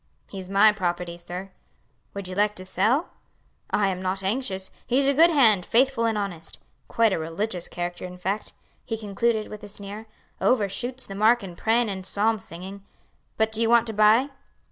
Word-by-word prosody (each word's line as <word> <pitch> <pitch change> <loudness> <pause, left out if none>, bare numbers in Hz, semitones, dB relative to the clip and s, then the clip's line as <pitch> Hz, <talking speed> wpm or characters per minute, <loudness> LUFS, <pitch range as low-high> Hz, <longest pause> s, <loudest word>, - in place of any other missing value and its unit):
"He's 190 -2 -8
my 200 +2 +6
property, 175 -3 -3
sir." 180 +3 -8 0.6
"Would 200 -2 -5
you 185 - -6
like 210 +2 +1
to 185 - -7
sell?" 220 - +2 0.6
"I 200 -2 +2
am 185 -1 -3
not 190 +1 -2
anxious; 190 -3 -2 0.2
he's 265 +3 +2
a 280 - +4
good 325 +5 +6
hand, 225 - +4
faithful 245 +2 +2
and 225 -2 0
honest: 180 -6 -5 0.3
quite 225 -3 +2
a - - -1
religious 175 +3 -3
character 175 0 -5
in 180 0 -10
fact," 195 +4 -3 0.3
he 225 - -4
concluded 220 +1 -1
with 210 0 -10
a 205 - -8
sneer; 205 +2 -7 0.3
"overshoots 245 +3 0
the 195 - -8
mark 220 +4 +3
in 180 -3 -8
prayin 230 +5 +2
and 190 -2 -4
psalm 215 +3 0
singing. 190 +3 -9 0.5
But 220 0 +1
do 220 +1 -1
you 225 - +2
want 235 -1 +5
to 225 - -4
buy?" 215 +6 +4
205 Hz, 185 wpm, -25 LUFS, 190-230 Hz, 0.6 s, my